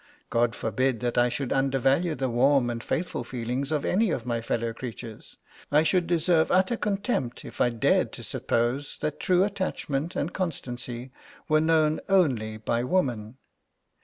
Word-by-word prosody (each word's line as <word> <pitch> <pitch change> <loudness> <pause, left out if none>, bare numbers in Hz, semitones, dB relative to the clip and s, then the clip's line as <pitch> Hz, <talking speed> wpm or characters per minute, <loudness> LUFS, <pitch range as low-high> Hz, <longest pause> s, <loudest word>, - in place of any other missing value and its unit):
God 115 0 +2
forbid 115 +3 0
that 120 -1 -1
I 120 0 +4
should 135 +1 -2
undervalue 135 +5 +2
the 130 +1 -1
warm 125 +1 +3
and 115 0 -5
faithful 170 -7 -2
feelings 125 +4 -3
of 150 -2 0
any 210 +3 +2
of 120 -8 -2
my 120 -2 -1
fellow 115 0 -2
creatures. 115 -2 -8 0.3
I 150 +2 +5
should 170 +2 +2
deserve 165 -1 +3
utter 185 +5 +3
contempt 200 - -2
if - - -6
I 125 - +4
dared 115 -2 +2
to - - -8
suppose 120 +5 -1
that 150 - -2
true 180 0 +3
attachment 175 -6 -2
and 160 +5 -2
constancy 125 -7 -4 0.4
were 155 0 +3
known 155 -1 +3
only 125 - +2
by 115 +2 -1
woman. 125 -7 -1
135 Hz, 160 wpm, -27 LUFS, 120-165 Hz, 0.4 s, I